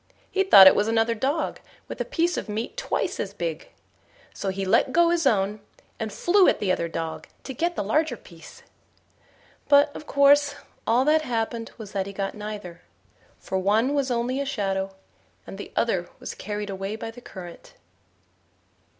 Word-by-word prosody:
He 385 - +1
thought 195 - +9
it 190 - +10
was 205 - +1
another 225 0 +2
dog 275 +8 -1 0.3
with - - -6
a - - -1
piece 350 -7 0
of - - -5
meat 220 - -4
twice - - -2
as - - -4
big; - - -4 0.6
so 195 - -3
he 195 0 -3
let 225 +6 +3
go 340 +2 +4
his 335 -4 +2
own, 205 -2 +1 0.4
and 220 -1 -3
flew 370 - +4
at - - +3
the 195 -3 0
other 170 -2 0
dog 165 -1 -5 0.2
to 265 - -6
get 340 +7 -1
the - - -1
larger 270 +5 0
piece. 170 -4 -15 1.1
But, 285 0 +5
of 305 - -9
course, 285 0 +4 0.3
all 240 +4 +3
that 310 +1 +4
happened 230 -3 -3
was 215 -3 -9
that 195 -2 -2
he 200 - -7
got 195 0 -3
neither; 210 -5 -7 0.6
for 190 - -3
one 220 +8 +2
was 280 -2 0
only 245 +2 -1
a - - 0
shadow, 195 -7 -2 0.5
and 195 - -9
the - - -8
other 185 -7 0
was - - -6
carried 205 0 -5
away 195 +2 -4
by 225 0 -6
the 245 +2 -13
current. 180 -7 -11
225 Hz, 180 wpm, -25 LUFS, 195-285 Hz, 1.1 s, it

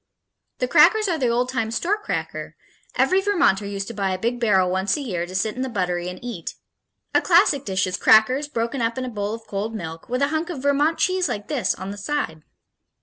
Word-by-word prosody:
The - - -1
crackers 435 -3 +5
are 335 -4 0
the 255 - +1
old 245 +2 +1
time 230 -4 -1
store 340 - 0
cracker 425 - -5 0.4
every 375 +1 +3
Vermonter 345 - +2
used 200 -1 -4
to - - -6
buy 195 -3 -1
a 185 - -1
big 235 +4 -2
barrel 190 -6 +3
once 190 +8 0
a - - -4
year 180 -10 -3
to 185 - -9
set 210 +3 0
in 255 - -4
the 260 - -2
buttery 180 -5 -2
and 180 - -7
eat. 235 -9 -6 0.6
A - - +4
classic 335 -6 +4
dish 190 -2 0
is 185 -1 -2
crackers, 255 +7 +4
broken 235 -1 -2
up 230 +1 -1
in 260 - -2
a - - -4
bowl 210 -1 -3
of 225 -1 -13
cold 210 +3 -4
milk, 165 -2 -7
with 250 +3 0
a 280 - +2
hunk 315 +3 -2
of 285 -7 -6
Vermont 290 +3 +2
cheese 370 -1 +1
like 205 0 -5
this 250 -10 0
on 190 +1 -6
the 205 - -8
side. 200 - -3
230 Hz, 230 wpm, -23 LUFS, 195-285 Hz, 0.6 s, crackers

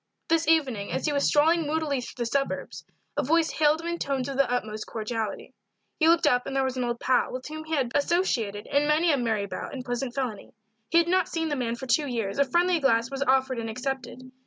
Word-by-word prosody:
This 330 -1 +2
evening, 265 -11 +1
as - - -2
he 300 - +1
was 280 0 +2
strolling 320 +2 +3
moodily 300 -3 -1
through 240 0 -5
the - - -3
suburbs, 275 +4 -2 0.3
a - - +3
voice 325 +4 +2
hailed 305 +1 +2
him 335 - -6
in 340 0 -2
tones 270 -2 -1
of 275 - -4
the 275 -2 +2
utmost 215 -3 -3
cordiality. 220 -1 -4 0.5
He 320 - +4
looked 335 0 +4
up 245 0 +2
and 275 - -4
there 270 - +2
was 260 -1 -2
an 255 - -1
old 240 -1 -2
pal, 255 - +1
with 255 0 -6
whom 310 +1 -7
he 320 0 -1
had 265 -4 0
been 265 - +1
associated 240 - 0
in 285 +1 +1
many 320 +3 +3
a 285 - +2
merry 220 -5 0
bout 200 - -6
and 255 -2 -6
pleasant 245 0 -3
felony; 255 -7 -4 0.3
he 335 - +3
had 335 0 +4
not 370 +1 +2
seen 325 -1 -2
the 290 - -1
man 240 -3 -2
for 265 - -7
two 285 +4 +2
years; 230 -2 -3
a 280 - +5
friendly 350 0 +3
glass 235 -4 +2
was 275 0 -4
offered 265 -2 +2
and 225 -1 -4
accepted. 255 +1 -5
270 Hz, 245 wpm, -26 LUFS, 245-315 Hz, 0.5 s, a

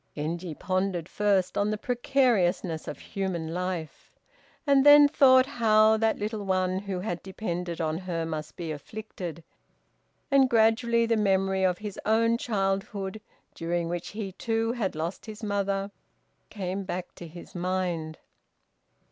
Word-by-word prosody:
Genji 165 +2 -4
pondered 185 -2 -1
first 195 -3 +1
on 205 +1 +1
the 215 - -1
precariousness 235 - +1
of - - -5
human 175 -5 -4
life, 180 -3 -4 0.6
and 280 -2 +5
then 290 0 +9
thought 260 -3 +6
how 220 -4 +4
that 220 0 +1
little 210 0 -3
one 185 -1 0
who 195 -2 -4
had 175 -3 -3
depended 180 -3 -4
on 160 0 -1
her 175 -3 -3
must 155 -1 -5
be 170 -3 -5
afflicted, 170 0 -7 0.9
and 270 -2 +5
gradually 230 +1 +3
the 230 0 +2
memory 195 -2 +1
of 180 -1 +2
his 210 -1 -7
own 230 +2 +3
childhood, 195 -1 -2 0.3
during 170 0 -2
which 175 0 -4
he 205 -2 -5
too 225 +3 -1
had 225 -8 -2
lost 165 +7 -4
his 215 +1 -9
mother, 200 -1 -1 0.6
came 195 -1 -4
back 180 -1 -5
to 175 - -10
his 170 +2 -12
mind. 175 -3 -2
195 Hz, 140 wpm, -27 LUFS, 175-220 Hz, 0.9 s, then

